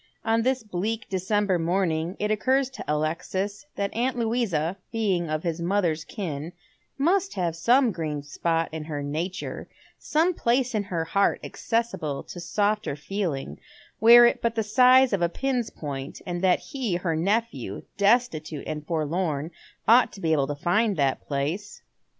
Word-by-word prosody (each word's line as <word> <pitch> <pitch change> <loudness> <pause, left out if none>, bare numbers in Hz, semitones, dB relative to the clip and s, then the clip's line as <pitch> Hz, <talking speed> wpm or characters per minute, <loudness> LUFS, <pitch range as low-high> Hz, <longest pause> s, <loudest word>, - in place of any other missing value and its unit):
On 225 0 +2
this 260 0 0
bleak 215 +4 -3
December 190 0 +1
morning 170 0 0
it 210 +1 -1
occurs 260 +5 +1
to - - -8
Alexis 180 - -2
that 200 0 -2
aunt 250 +2 0
Louisa, 220 -8 0 0.2
being 195 -7 0
of 155 0 -2
his 170 -1 -2
mother's 170 -3 0
kin, 165 -5 -5 0.4
must 375 +7 +1
have 170 -3 -1
some 240 +8 +4
green 155 -5 -4
spot 165 +3 -1
in 160 -1 -5
her 150 -2 -4
nature, 165 +6 -4 0.3
sonio 330 +4 +1
place 250 0 +1
in 210 -2 0
her 170 -4 -2
heart 200 +4 +2
accessible 225 -12 -2
to 175 - -9
softer 205 0 0
feeling, 150 - -4 0.4
were 240 +2 +9
it 240 - +2
but 230 -1 0
the 225 - +1
size 255 +3 +5
of 195 - +1
a 170 - +2
pin's 255 +2 -1
point, 140 -2 -6
and 175 -1 -3
that 185 -1 +4
he, 245 -10 -1
her 175 -2 -1
nephew, 165 - -1
destitute 200 - +1
and 150 -1 -5
forlorn, 160 -1 -1 0.4
ought 240 +3 +6
to - - -10
be 165 -3 0
able 140 -3 +2
to 145 - -3
find 200 +7 +1
that 135 -2 +1
place. 155 +9 -3
190 Hz, 160 wpm, -26 LUFS, 160-225 Hz, 0.4 s, were